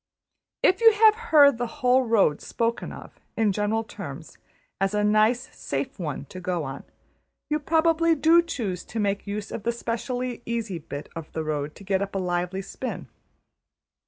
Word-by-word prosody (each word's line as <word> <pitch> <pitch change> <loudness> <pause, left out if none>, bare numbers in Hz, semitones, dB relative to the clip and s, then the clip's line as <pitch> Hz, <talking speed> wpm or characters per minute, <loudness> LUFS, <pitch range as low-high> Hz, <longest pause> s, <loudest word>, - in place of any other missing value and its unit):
If 375 +4 +4
you 455 -1 +8
have 430 0 +6 0.2
heard 285 -5 +6
the 245 - -1
whole 255 -1 +2
road 220 - +2
spoken 230 0 -2
of, - - -11 0.2
in 220 -2 +3
general 210 +3 0
terms, 165 -8 -9 0.4
as 195 +2 0
a 210 - +1
nice 215 +5 +2
safe 140 +6 -4
one 150 -5 -4
to 185 - -8
go 180 -2 -2
on, 135 -1 -7 0.7
you 300 - +2
probably 330 +2 +3
do 325 +3 +5
choose 225 - -4
to 225 - -5
make 200 -1 -1
use 205 +1 -4
of - - -4
the 235 +3 0
specially 240 +1 -3
easy 225 -6 -3
bit 145 -2 -7
of 165 -2 -7
the 160 - -2
road 150 -1 -3
to - - -13
get 195 0 0
up 200 0 -4
a - - +1
lively 180 +1 -2
spin. 255 +6 -6
215 Hz, 175 wpm, -25 LUFS, 185-255 Hz, 0.7 s, you